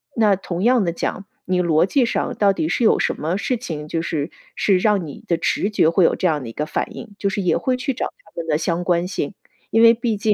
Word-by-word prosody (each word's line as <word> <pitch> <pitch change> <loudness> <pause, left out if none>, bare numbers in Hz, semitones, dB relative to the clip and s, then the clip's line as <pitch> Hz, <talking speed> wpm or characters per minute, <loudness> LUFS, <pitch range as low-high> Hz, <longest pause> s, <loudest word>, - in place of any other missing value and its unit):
那 215 -3 +4
同 180 -1 -4
样 245 -1 +4
的 170 - 0
讲， 180 +3 -4 0.2
你 180 0 +1
逻 165 -2 +3
辑 255 +6 +2
上 235 - -1
到 200 -1 +4
底 155 - -1
是 235 - 0
有 - - +5
什 - - 0
么 160 +4 -1
事 250 +4 -1
情， 155 -10 -6
就 165 - -1
是 160 -2 -3 0.2
是 195 -3 +3
让 205 -2 +2
你 145 - -10
的 170 - +2
直 200 - 0
觉 205 -6 +3
会 170 +2 +3
有 - - +3
这 - - -3
样 155 -3 0
的 125 - -7
一 - - -7
个 150 - -2
反 - - -3
应？ 210 - -9
就 200 - 0
是 200 +1 -2
也 175 -3 +2
会 255 - 0
去 265 +2 -2
找 255 - -2
他 - - -19
们 165 - -4
的 150 -2 +2
相 170 +2 -1
关 175 0 +1
性， 185 -3 -3 0.4
因 225 - +3
为 230 0 +8
毕 235 -1 -1
竟 210 +1 +2
185 Hz, 290 characters per minute, -21 LUFS, 165-220 Hz, 0.4 s, 为